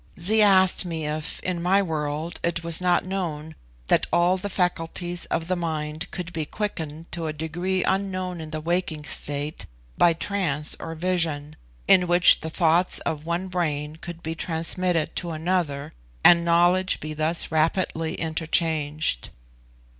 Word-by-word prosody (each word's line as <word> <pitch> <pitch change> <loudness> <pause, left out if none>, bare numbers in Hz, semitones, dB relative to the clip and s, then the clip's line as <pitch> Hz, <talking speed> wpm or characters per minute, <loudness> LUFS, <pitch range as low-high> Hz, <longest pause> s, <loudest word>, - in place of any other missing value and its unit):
Zee 215 +6 +3
asked 190 -3 +5
me 165 -3 -4
if, 150 +1 -3
in 180 -2 -3
my 185 +3 +3
world, 155 -1 -3
it 170 0 -2
was 165 +1 -2
not 180 -1 +2
known 160 -5 -4 0.3
that - - +2
all 175 +2 +3
the 195 +2 -4
faculties 175 -1 -1
of 165 - -2
the 185 - 0
mind 155 -2 -4
could 175 -1 -6
be 160 - -2
quickened 160 -3 -5
to 165 -2 -3
a 155 - -3
degree 175 +4 -2
unknown 185 -3 -2
in 155 - -8
the 155 0 -4
waking 165 -2 -2
state, 145 +1 0 0.3
by 170 - +5
trance 160 -5 -2
or 165 0 -6
vision, 160 -4 -1 0.3
in 180 -1 +5
which 175 +1 +6
the 160 - -4
thoughts 170 +2 +4
of 155 -1 -4
one 175 +3 -2
brain 155 -4 -2
could 170 0 -9
be 160 - -3
transmitted 165 +1 +1
to 175 - -2
another, 160 -3 -2 0.3
and 170 -1 +7
knowledge 175 +2 +3
be 155 +1 -5
thus 155 +3 0
rapidly 160 0 0
interchanged. 155 - -1
170 Hz, 155 wpm, -24 LUFS, 155-180 Hz, 0.3 s, and